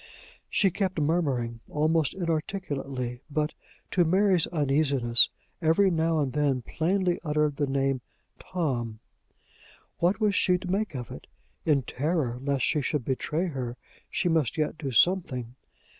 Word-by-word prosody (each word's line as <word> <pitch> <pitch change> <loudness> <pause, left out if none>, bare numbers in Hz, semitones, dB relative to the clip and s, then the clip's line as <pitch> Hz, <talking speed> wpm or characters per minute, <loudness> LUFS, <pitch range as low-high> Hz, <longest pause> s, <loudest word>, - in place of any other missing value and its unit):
She 195 -2 +3
kept 190 -2 -1
murmuring 140 -7 0
almost 155 0 +1
inarticulately; 145 -8 -3
but, 150 +1 -1 0.4
to 180 - +4
Mary's 185 0 +3
uneasiness, 140 -6 +3 0.3
every 175 +4 +4
now 165 -1 +1
and 135 -4 -1
then 140 -4 +1
plainly 180 +4 0
uttered 150 -2 +1
the 145 - 0
name 135 -1 0 0.4
Tom. 125 -11 -2 1.0
What 180 +5 +2
was 210 -2 +2
she 180 -1 +3
to 180 0 -5
make 200 -4 -1
of 125 -3 -5
it? - - -10 0.4
In 145 -4 +3
terror 135 -3 -1
lest 140 -1 0
she 150 - +1
should 140 -2 -1
betray 150 +6 -1
her, 125 -4 -4 0.3
she - - 0
must 160 -5 +1
yet 155 0 0
do 140 - -3
something. 130 -5 +2
150 Hz, 140 wpm, -27 LUFS, 135-175 Hz, 1.0 s, to